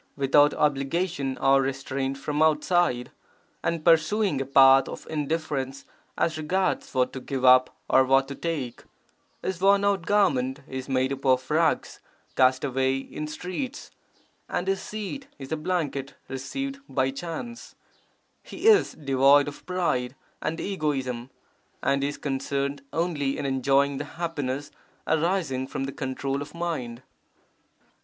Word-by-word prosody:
without 145 Hz, +1 st, +5 dB
obligation 145 Hz, 0 st, 0 dB
or 135 Hz, 0 st, +4 dB
restraint 135 Hz, 0 st, -2 dB
from 150 Hz, +2 st, -2 dB
outside) 155 Hz, -4 st, +2 dB, 0.5 s
and 165 Hz, -2 st, -1 dB
pursuing 170 Hz, 0 st, +3 dB
a -, -, -2 dB
path 135 Hz, 0 st, +6 dB
of -, -, -8 dB
indifference 145 Hz, -3 st, -2 dB, 0.3 s
as 155 Hz, -2 st, 0 dB
regards 185 Hz, +5 st, -1 dB
what 130 Hz, 0 st, +2 dB
to 130 Hz, -, -5 dB
give 130 Hz, 0 st, -3 dB
up 130 Hz, 0 st, +6 dB
or 130 Hz, -, +5 dB
what 135 Hz, +1 st, +3 dB
to 140 Hz, -, -5 dB
take; 140 Hz, -6 st, -4 dB, 0.6 s
his 185 Hz, -2 st, -3 dB
worn 200 Hz, +1 st, +4 dB
out 195 Hz, -5 st, +1 dB
garment 145 Hz, -10 st, +2 dB
is 130 Hz, 0 st, -6 dB
made 130 Hz, 0 st, +1 dB
up 135 Hz, -, -8 dB
of 130 Hz, 0 st, +2 dB
rags 160 Hz, +1 st, +1 dB, 0.4 s
cast 130 Hz, 0 st, +4 dB
away 135 Hz, -1 st, +1 dB
in 150 Hz, +3 st, -6 dB
streets, 185 Hz, -, -5 dB, 0.6 s
and 180 Hz, -, -2 dB
his 195 Hz, 0 st, 0 dB
seat 215 Hz, +6 st, -6 dB
is 135 Hz, 0 st, -9 dB
a -, -, +1 dB
blanket 150 Hz, -4 st, -2 dB
received 275 Hz, -, -4 dB
by 130 Hz, -1 st, +1 dB
chance; 175 Hz, -, -7 dB, 0.7 s
he -, -, -9 dB
is 425 Hz, -2 st, +6 dB
devoid 140 Hz, 0 st, +4 dB
of 145 Hz, -, -8 dB
pride 155 Hz, -9 st, -1 dB, 0.3 s
and 165 Hz, +1 st, -2 dB
egoism 135 Hz, -9 st, -2 dB, 0.5 s
and 140 Hz, 0 st, +2 dB
he 140 Hz, -, 0 dB
is 145 Hz, -, -6 dB
concerned 140 Hz, 0 st, -2 dB
only 155 Hz, -5 st, -1 dB
in -, -, -3 dB
enjoying 135 Hz, +1 st, +2 dB
the 145 Hz, -, -3 dB
happiness 145 Hz, -5 st, -3 dB, 0.3 s
arising 160 Hz, -5 st, 0 dB
from 135 Hz, -, -4 dB
the 135 Hz, -, -3 dB
control 135 Hz, +1 st, -3 dB
of 145 Hz, +3 st, -8 dB
mind. 130 Hz, -9 st, -4 dB
140 Hz, 140 wpm, -26 LUFS, 135-170 Hz, 0.7 s, path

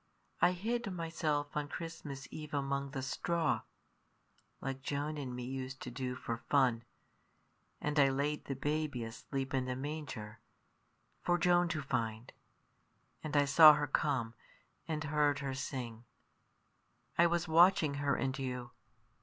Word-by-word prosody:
I 180 Hz, -, +5 dB
hid 225 Hz, +3 st, -2 dB
myself 160 Hz, -4 st, -2 dB
on 150 Hz, -1 st, -1 dB
Christmas 145 Hz, -4 st, -6 dB
Eve 150 Hz, -1 st, -6 dB
among 140 Hz, 0 st, -1 dB
the 135 Hz, -1 st, -4 dB
straw 165 Hz, +4 st, 0 dB, 1.0 s
like 135 Hz, 0 st, -4 dB
Joan 145 Hz, +3 st, -2 dB
and 130 Hz, -3 st, -4 dB
me 125 Hz, -, -5 dB
used 130 Hz, +1 st, -5 dB
to 125 Hz, -, -6 dB
do 125 Hz, 0 st, -3 dB
for 115 Hz, -2 st, -4 dB
fun 125 Hz, -5 st, +3 dB, 1.0 s
and 150 Hz, 0 st, 0 dB
I 140 Hz, -1 st, +6 dB
laid 145 Hz, +3 st, -1 dB
the 135 Hz, -, -3 dB
baby 145 Hz, -2 st, -1 dB
asleep 135 Hz, +4 st, -5 dB
in 130 Hz, -1 st, +1 dB
the 130 Hz, 0 st, -2 dB
manger 130 Hz, -7 st, -5 dB, 0.8 s
for 175 Hz, 0 st, +2 dB
Joan 175 Hz, 0 st, +4 dB
to 160 Hz, -3 st, -2 dB
find; 115 Hz, -3 st, -2 dB, 0.9 s
and 150 Hz, -1 st, -1 dB
I 145 Hz, -, +5 dB
saw 155 Hz, +2 st, +9 dB
her 150 Hz, 0 st, 0 dB
come, 130 Hz, -5 st, 0 dB, 0.5 s
and 155 Hz, -1 st, -2 dB
heard 150 Hz, -1 st, +2 dB
her 140 Hz, -2 st, -3 dB
sing 125 Hz, -4 st, -5 dB, 1.1 s
I 170 Hz, -, +6 dB
was 170 Hz, 0 st, 0 dB
watching 165 Hz, -2 st, +5 dB
her 140 Hz, -1 st, +2 dB
and 135 Hz, +1 st, -2 dB
you. 125 Hz, -2 st, -4 dB
140 Hz, 145 wpm, -34 LUFS, 130-155 Hz, 1.1 s, saw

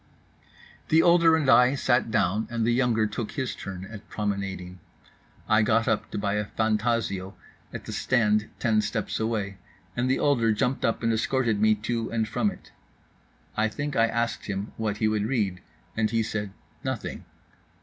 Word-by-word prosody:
The 160 Hz, +1 st, +5 dB
older 170 Hz, -2 st, +6 dB
and 155 Hz, -4 st, 0 dB
I 125 Hz, +1 st, +6 dB
sat 125 Hz, -3 st, +2 dB
down, 105 Hz, 0 st, +1 dB
and 115 Hz, -2 st, -1 dB
the 120 Hz, -, +3 dB
younger 120 Hz, -3 st, +2 dB
took 105 Hz, +1 st, -4 dB
his 130 Hz, -3 st, -2 dB
turn 95 Hz, -1 st, -7 dB
at 105 Hz, +1 st, -11 dB
promenading. 100 Hz, -3 st, -3 dB, 0.7 s
I 110 Hz, +1 st, +4 dB
got 115 Hz, +1 st, +2 dB
up 110 Hz, -, 0 dB
to -, -, -5 dB
buy 100 Hz, -1 st, -1 dB
a 105 Hz, -, -1 dB
Fantasio 110 Hz, -3 st, -1 dB, 0.4 s
at -, -, -7 dB
the -, -, -6 dB
stand 110 Hz, -4 st, +2 dB
ten 110 Hz, -2 st, +2 dB
steps 105 Hz, 0 st, -2 dB
away, 105 Hz, -3 st, -2 dB, 0.4 s
and 125 Hz, +1 st, 0 dB
the 130 Hz, -, +3 dB
older 115 Hz, -6 st, +2 dB
jumped 125 Hz, +5 st, -1 dB
up 115 Hz, -, 0 dB
and 115 Hz, 0 st, +2 dB
escorted 115 Hz, -2 st, +1 dB
me 110 Hz, 0 st, +5 dB
to 115 Hz, +2 st, -3 dB
and 110 Hz, -1 st, -1 dB
from 205 Hz, -, +1 dB
it. -, -, -12 dB, 0.8 s
I 110 Hz, +1 st, +2 dB
think 145 Hz, +7 st, -4 dB
I 115 Hz, 0 st, +4 dB
asked 115 Hz, 0 st, -2 dB
him 100 Hz, +1 st, -3 dB
what 105 Hz, -2 st, -2 dB
he 110 Hz, -, +1 dB
would 110 Hz, -1 st, 0 dB
read? 105 Hz, -8 st, -1 dB, 0.3 s
and 110 Hz, -1 st, +1 dB
he 115 Hz, -1 st, +1 dB
said 105 Hz, -2 st, -3 dB, 0.3 s
"Nothing." -, -, -4 dB
110 Hz, 175 wpm, -26 LUFS, 105-120 Hz, 0.8 s, older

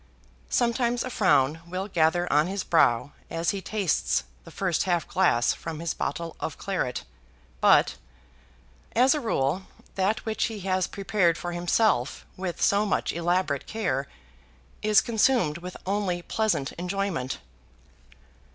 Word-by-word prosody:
Sometimes 240 Hz, 0 st, +1 dB
a 255 Hz, -, -5 dB
frown 165 Hz, -, +3 dB
will 185 Hz, +3 st, -4 dB
gather 175 Hz, -1 st, +2 dB
on 150 Hz, +3 st, +4 dB
his 195 Hz, +1 st, -3 dB
brow 135 Hz, -4 st, +3 dB, 0.2 s
as 165 Hz, 0 st, 0 dB
he 200 Hz, -, -4 dB
tastes 195 Hz, -, 0 dB, 0.2 s
the -, -, -10 dB
first 185 Hz, -4 st, -1 dB
half 175 Hz, -3 st, 0 dB
glass 155 Hz, -10 st, +3 dB
from 160 Hz, -2 st, -6 dB
his 165 Hz, -1 st, -2 dB
bottle 165 Hz, 0 st, -4 dB
of 160 Hz, -, -4 dB
claret; 180 Hz, -11 st, -2 dB, 0.6 s
but -, -, +4 dB, 1.0 s
as 255 Hz, +3 st, +5 dB
a 305 Hz, -, -1 dB
rule 180 Hz, -, 0 dB, 0.3 s
that 200 Hz, +4 st, 0 dB
which 220 Hz, -1 st, 0 dB
he 220 Hz, -3 st, -5 dB
has 185 Hz, -1 st, 0 dB
prepared 195 Hz, -4 st, +1 dB
for 175 Hz, -, -4 dB
himself 175 Hz, -, +1 dB
with 185 Hz, -2 st, -4 dB
so 200 Hz, +1 st, +3 dB
much 210 Hz, -, 0 dB
elaborate 170 Hz, -4 st, 0 dB
care, 140 Hz, -12 st, -1 dB, 0.7 s
is 210 Hz, -1 st, +5 dB
consumed 220 Hz, -, +2 dB
with 180 Hz, +1 st, -8 dB
only 190 Hz, -3 st, -1 dB
pleasant 210 Hz, -12 st, 0 dB
enjoyment. 180 Hz, -7 st, -2 dB
185 Hz, 135 wpm, -26 LUFS, 165-210 Hz, 1.0 s, as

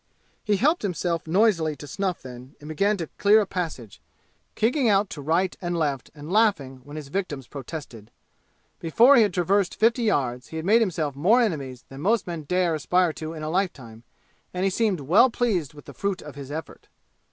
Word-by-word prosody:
He 210 Hz, -2 st, +1 dB
helped 305 Hz, -, +2 dB
himself 170 Hz, -4 st, -2 dB
noisily 170 Hz, -4 st, +2 dB
to 145 Hz, -, -10 dB
snuff 185 Hz, +4 st, -3 dB
then 125 Hz, +1 st, -11 dB
and 150 Hz, -, -12 dB
began 200 Hz, +7 st, +1 dB
to 170 Hz, -, -3 dB
clear 210 Hz, +2 st, +6 dB
a 210 Hz, -, +1 dB
passage, 160 Hz, -, -5 dB, 0.5 s
kicking 245 Hz, +2 st, +2 dB
out 200 Hz, -1 st, +2 dB
to 145 Hz, -, -6 dB
right 170 Hz, +6 st, 0 dB
and 175 Hz, -1 st, -2 dB
left 145 Hz, -6 st, -2 dB
and 150 Hz, +3 st, -9 dB
laughing 160 Hz, -, +1 dB
when 145 Hz, +2 st, -11 dB
his 150 Hz, -3 st, -7 dB
victims 150 Hz, -7 st, -3 dB
protested. 130 Hz, -5 st, -9 dB, 0.7 s
Before 235 Hz, -, +5 dB
he 240 Hz, -, +6 dB
had 210 Hz, -3 st, +3 dB
traversed 185 Hz, +2 st, +1 dB
fifty 230 Hz, +3 st, +2 dB
yards 130 Hz, -, 0 dB
he -, -, -10 dB
had 160 Hz, 0 st, -4 dB
made 220 Hz, +4 st, +5 dB
himself 160 Hz, -9 st, -1 dB
more 190 Hz, -, +4 dB
enemies 140 Hz, -, -2 dB
than 135 Hz, +1 st, -9 dB
most 215 Hz, +4 st, +1 dB
men 170 Hz, -4 st, -6 dB
dare 180 Hz, +1 st, +1 dB
aspire 175 Hz, +2 st, +1 dB
to 155 Hz, +1 st, -6 dB
in 155 Hz, -1 st, -7 dB
a 155 Hz, -, -3 dB
lifetime, 135 Hz, -, -3 dB, 0.5 s
and 180 Hz, -, -1 dB
he 195 Hz, -, +2 dB
seemed 200 Hz, -5 st, 0 dB
well 175 Hz, -, +5 dB
pleased 195 Hz, -, -1 dB
with 145 Hz, -, -13 dB
the -, -, -11 dB
fruit 200 Hz, -2 st, -3 dB
of 150 Hz, -, -9 dB
his 140 Hz, -1 st, -9 dB
effort. 155 Hz, +1 st, -8 dB
170 Hz, 195 wpm, -25 LUFS, 145-200 Hz, 0.7 s, clear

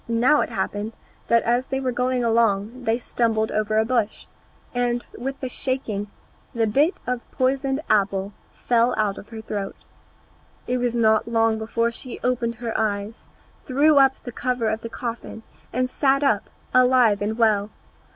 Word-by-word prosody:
Now 240 Hz, +6 st, +3 dB
it -, -, -2 dB
happened 210 Hz, +2 st, -3 dB, 0.3 s
that 235 Hz, 0 st, +4 dB
as 240 Hz, +2 st, +1 dB
they 265 Hz, -, -2 dB
were 260 Hz, -1 st, -1 dB
going 250 Hz, 0 st, 0 dB
along 230 Hz, +1 st, +1 dB
they 225 Hz, +1 st, +2 dB
stumbled 225 Hz, -2 st, 0 dB
over 215 Hz, 0 st, 0 dB
a 220 Hz, -, +3 dB
bush, 230 Hz, -3 st, -1 dB, 0.5 s
and 245 Hz, -1 st, 0 dB
with 270 Hz, +3 st, -5 dB
the 260 Hz, -, -2 dB
shaking 250 Hz, -6 st, -2 dB, 0.5 s
the 230 Hz, -1 st, +2 dB
bit 285 Hz, -, +2 dB
of 250 Hz, -1 st, -2 dB
poisoned 270 Hz, +2 st, 0 dB
apple 200 Hz, -1 st, +1 dB, 0.3 s
flew 240 Hz, 0 st, +3 dB
out 205 Hz, -2 st, 0 dB
of -, -, -13 dB
her 225 Hz, -1 st, -7 dB
throat. 200 Hz, -2 st, -4 dB, 0.9 s
It 250 Hz, -, 0 dB
was 245 Hz, -1 st, 0 dB
not 220 Hz, -1 st, +3 dB
long 225 Hz, -1 st, +2 dB
before 230 Hz, +1 st, 0 dB
she 245 Hz, +1 st, -7 dB
opened 245 Hz, -2 st, 0 dB
her 230 Hz, -1 st, -5 dB
eyes, 210 Hz, +1 st, -2 dB, 0.4 s
threw 285 Hz, +3 st, +3 dB
up 270 Hz, -1 st, +6 dB
the 245 Hz, -, -6 dB
cover 245 Hz, -1 st, -1 dB
of 220 Hz, +1 st, -2 dB
the 230 Hz, -, -6 dB
coffin, 230 Hz, -1 st, -6 dB, 0.3 s
and 255 Hz, +1 st, 0 dB
sat 275 Hz, +2 st, +2 dB
up, 215 Hz, -7 st, +1 dB, 0.2 s
alive 250 Hz, -5 st, +5 dB
and 215 Hz, +2 st, -1 dB
well. 215 Hz, -3 st, +3 dB
235 Hz, 165 wpm, -23 LUFS, 220-255 Hz, 0.9 s, up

